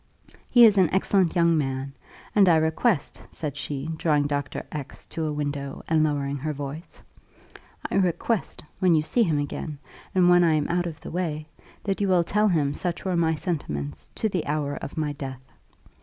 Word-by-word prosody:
He 240 Hz, -1 st, +8 dB
is 205 Hz, -3 st, +5 dB
an 185 Hz, -, +5 dB
excellent 190 Hz, -2 st, +2 dB
young 170 Hz, -1 st, +4 dB
man; 135 Hz, -1 st, -3 dB, 0.4 s
and 200 Hz, -3 st, +6 dB
I 170 Hz, -, +6 dB
request," 160 Hz, -, +1 dB
said 150 Hz, -4 st, -5 dB
she, 145 Hz, 0 st, -4 dB
drawing 150 Hz, -3 st, +2 dB
Dr. 145 Hz, -1 st, -3 dB
X 145 Hz, -3 st, -7 dB
to 160 Hz, -1 st, -3 dB
a -, -, -1 dB
window, 145 Hz, -2 st, -4 dB
and 160 Hz, -1 st, +3 dB
lowering 140 Hz, -2 st, 0 dB
her 150 Hz, +3 st, -3 dB
voice, 145 Hz, +4 st, -8 dB, 0.9 s
"I -, -, +1 dB
request, 185 Hz, +4 st, 0 dB, 0.2 s
when 180 Hz, -3 st, +4 dB
you 155 Hz, -, +2 dB
see 235 Hz, +10 st, +1 dB
him 165 Hz, -9 st, +2 dB
again, 145 Hz, +1 st, -4 dB, 0.4 s
and 180 Hz, -1 st, +5 dB
when 175 Hz, 0 st, +6 dB
I 165 Hz, -2 st, +4 dB
am 150 Hz, -1 st, 0 dB
out 175 Hz, +1 st, 0 dB
of 160 Hz, -2 st, -7 dB
the -, -, -8 dB
way, 160 Hz, -4 st, -2 dB, 0.4 s
that 195 Hz, 0 st, -1 dB
you 200 Hz, -, +2 dB
will 180 Hz, -2 st, +4 dB
tell 210 Hz, +5 st, +2 dB
him 150 Hz, -7 st, +1 dB
such 175 Hz, +4 st, -3 dB
were 185 Hz, -2 st, 0 dB
my 165 Hz, -1 st, +2 dB
sentiments 105 Hz, -, -4 dB
to 220 Hz, -, 0 dB
the 185 Hz, -5 st, -2 dB
hour 145 Hz, -1 st, -1 dB
of 140 Hz, -, -7 dB
my 150 Hz, -2 st, -1 dB
death. 135 Hz, -2 st, -7 dB
160 Hz, 190 wpm, -25 LUFS, 145-180 Hz, 0.9 s, He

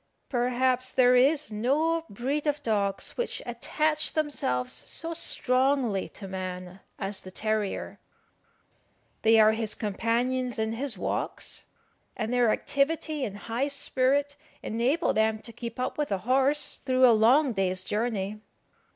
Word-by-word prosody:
Perhaps 255 Hz, 0 st, +1 dB
there 250 Hz, -1 st, +5 dB
is 280 Hz, +2 st, +3 dB
no 305 Hz, +10 st, +1 dB
breed 275 Hz, +8 st, -2 dB
of 290 Hz, 0 st, 0 dB
dogs 200 Hz, -4 st, -1 dB
which 485 Hz, -, -2 dB
attach 305 Hz, +6 st, -1 dB
themselves 125 Hz, -, -1 dB
so 335 Hz, 0 st, -6 dB
strongly 255 Hz, -, +2 dB
to 195 Hz, -, -9 dB
man 185 Hz, -1 st, -6 dB, 0.2 s
as 195 Hz, 0 st, -4 dB
the 185 Hz, -, -9 dB
terrier. 215 Hz, +1 st, -2 dB, 1.2 s
They 225 Hz, 0 st, +5 dB
are 215 Hz, 0 st, +7 dB
his 220 Hz, -1 st, -2 dB
companions 235 Hz, +4 st, -1 dB
in 220 Hz, 0 st, -1 dB
his 260 Hz, +2 st, -2 dB
walks, -, -, -3 dB, 0.5 s
and 225 Hz, +1 st, -2 dB
their 245 Hz, -2 st, +3 dB
activity 300 Hz, +4 st, 0 dB
and 205 Hz, -2 st, -6 dB
high 230 Hz, +6 st, -2 dB
spirit 280 Hz, 0 st, 0 dB, 0.3 s
enable 255 Hz, +9 st, +1 dB
them 220 Hz, 0 st, +2 dB
to 230 Hz, +1 st, -10 dB
keep 235 Hz, +1 st, -7 dB
up 255 Hz, +4 st, -3 dB
with 295 Hz, -7 st, -1 dB
a 195 Hz, -, +1 dB
horse 265 Hz, +8 st, +1 dB
through 255 Hz, -1 st, +3 dB
a 240 Hz, -, +7 dB
long 245 Hz, +5 st, +4 dB
day's 185 Hz, -2 st, -1 dB
journey. 210 Hz, -1 st, -2 dB
245 Hz, 135 wpm, -27 LUFS, 215-275 Hz, 1.2 s, are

